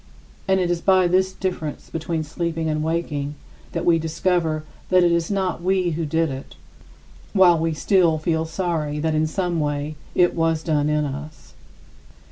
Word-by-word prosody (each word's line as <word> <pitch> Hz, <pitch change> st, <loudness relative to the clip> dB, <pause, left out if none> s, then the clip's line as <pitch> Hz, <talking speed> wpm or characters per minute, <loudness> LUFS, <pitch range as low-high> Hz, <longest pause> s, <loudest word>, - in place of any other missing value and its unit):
And 190 Hz, 0 st, +3 dB
it 175 Hz, -1 st, +1 dB
is 170 Hz, -1 st, -1 dB
by 185 Hz, -1 st, +4 dB
this 185 Hz, +2 st, +2 dB
difference 180 Hz, -6 st, -4 dB
between 165 Hz, 0 st, -2 dB
sleeping 165 Hz, +1 st, -3 dB
and 155 Hz, -1 st, 0 dB
waking 150 Hz, -3 st, -2 dB, 0.4 s
that 170 Hz, 0 st, -2 dB
we 170 Hz, -1 st, +4 dB
discover 160 Hz, -1 st, 0 dB, 0.3 s
that 185 Hz, -1 st, +5 dB
it 175 Hz, -, +4 dB
was 170 Hz, -1 st, +1 dB
not 190 Hz, -4 st, -1 dB
we 185 Hz, -1 st, +1 dB
who 160 Hz, 0 st, -2 dB
did 160 Hz, 0 st, +1 dB
it, 135 Hz, 0 st, -8 dB, 0.8 s
while 180 Hz, -4 st, +6 dB
we 165 Hz, 0 st, 0 dB
still 170 Hz, -1 st, +3 dB
feel 160 Hz, 0 st, 0 dB
sorry 160 Hz, -3 st, -2 dB
that 160 Hz, +1 st, 0 dB
in 155 Hz, 0 st, +2 dB
some 175 Hz, 0 st, -1 dB
way 145 Hz, 0 st, -2 dB, 0.2 s
it 175 Hz, -1 st, +4 dB
was 165 Hz, -1 st, 0 dB
done 150 Hz, -3 st, +1 dB
in 150 Hz, 0 st, +1 dB
us. 145 Hz, -, -8 dB
165 Hz, 170 wpm, -22 LUFS, 155-175 Hz, 0.8 s, while